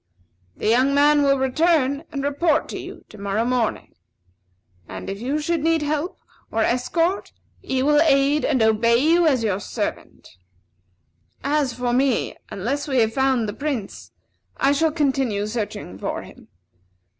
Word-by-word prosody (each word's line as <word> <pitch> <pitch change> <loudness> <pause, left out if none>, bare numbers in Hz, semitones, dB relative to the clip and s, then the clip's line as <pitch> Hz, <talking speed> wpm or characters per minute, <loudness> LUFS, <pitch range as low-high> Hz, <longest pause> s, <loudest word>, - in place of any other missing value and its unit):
The - - -3
young 255 +5 +3
man 295 +1 +5
will 275 -1 +3
return 280 +1 +1
and 275 -1 -4
report 290 +2 +1
to - - -5
you - - -10
to 215 - -13
morrow 200 +3 -1
morning. 245 -3 -1 1.0
And 95 - -6
if 195 +2 -7
you 270 +5 -1
should 320 +1 -1
need 325 -1 +2
help, 300 +4 -2 0.3
or 225 0 0
escort, 330 - 0 0.3
he 260 0 -1
will 295 +1 +4
aid 285 -1 +3
and 260 -6 +2
obey 220 +1 +3
you 330 +6 +3
as 260 -6 +2
your 200 -3 0
servant. 200 - -6 1.1
As 285 -3 0
for 245 0 -2
me, 260 0 +1
unless 270 +10 -3
we 265 -2 0
have 220 0 +1
found 265 -3 +1
the 205 - -4
Prince, 270 -6 -5 0.5
I 275 - +3
shall 315 +2 +2
continue 270 -9 0
searching 210 - -5
for - - -4
him. - - -15
270 Hz, 155 wpm, -22 LUFS, 230-295 Hz, 1.1 s, man